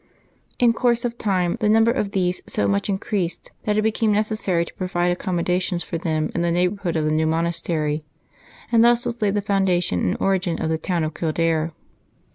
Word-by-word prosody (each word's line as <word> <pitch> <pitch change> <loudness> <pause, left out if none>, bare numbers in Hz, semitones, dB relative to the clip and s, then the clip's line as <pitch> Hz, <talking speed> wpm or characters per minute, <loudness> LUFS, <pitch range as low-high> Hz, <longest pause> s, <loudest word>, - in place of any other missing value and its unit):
In 240 -2 +4
course 240 0 +1
of 240 0 -3
time 185 -4 0
the 210 - +1
number 225 +2 +5
of 220 -5 -1
these 185 -2 0
so 100 - 0
much 100 - 0
increased 190 -2 -2
that 210 0 +1
it 215 - +2
became 220 0 +1
neces 215 +1 0
sary 170 -3 +1
to - - -12
provide 180 -1 -1
accommodation 180 0 -1
for 170 -1 -4
them 155 -2 -1
in 170 - -1
the 170 - +1
neighbor 180 +4 0
hood 175 -4 -2
of 155 -1 0
the 155 - +1
new 155 0 +2
monastery, 160 -2 -1 0.7
and 230 -1 +5
thus 240 0 +4
was 240 0 -3
laid 205 -1 +1
the 205 - 0
founda 195 -3 +2
tion 90 - -1
and 90 - 0
origin 190 -3 0
of 160 - -1
the 160 - 0
town 175 -1 -1
of 155 0 -2
Kildare. 165 0 0
180 Hz, 210 wpm, -22 LUFS, 165-210 Hz, 0.7 s, number